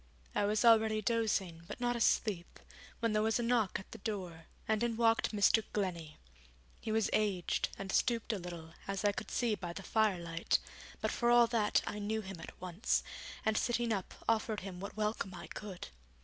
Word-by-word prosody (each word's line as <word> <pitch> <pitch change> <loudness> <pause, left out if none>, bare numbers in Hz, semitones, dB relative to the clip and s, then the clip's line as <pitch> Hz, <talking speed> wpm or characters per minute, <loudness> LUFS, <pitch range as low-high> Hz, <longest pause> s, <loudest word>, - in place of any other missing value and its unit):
I - - +2
was 210 +3 +2
already 220 -1 +6
dozing, 205 -7 0
but - - -7
not 245 0 +1
asleep, 210 -6 +1 0.4
when 230 -2 +1
there 215 - +3
was 220 +1 +2
a 240 - -1
knock 230 -4 +2
at 190 - -13
the - - -9
door, 185 -6 -5 0.2
and 220 -1 +1
in 235 -1 0
walked 230 -1 +3
Mr. 215 +1 +4
Glennie. 170 -6 -2 0.6
He 220 - -4
was 220 -1 +1
aged, 200 -5 +1
and 195 0 -5
stooped 230 +1 +1
a 205 - -2
little, 170 -2 -8
as 195 +1 -2
I 205 - +5
could - - -6
see 235 -3 +1
by 175 -4 -4
the 195 - -7
firelight, 175 -6 +1 0.4
but - - 0
for 240 - +1
all 240 0 +7
that 215 -3 +3
I 210 - -4
knew 215 +2 -1
him 190 -3 -8
at - - -10
once, 185 +3 0 0.4
and 220 0 +2
sitting 235 0 +1
up 195 -3 -4
offered 220 -1 +1
him 185 -2 -7
what 200 +3 -7
welcome 210 -3 -1
I 170 - -8
could. 195 - -7
210 Hz, 190 wpm, -34 LUFS, 185-225 Hz, 0.6 s, all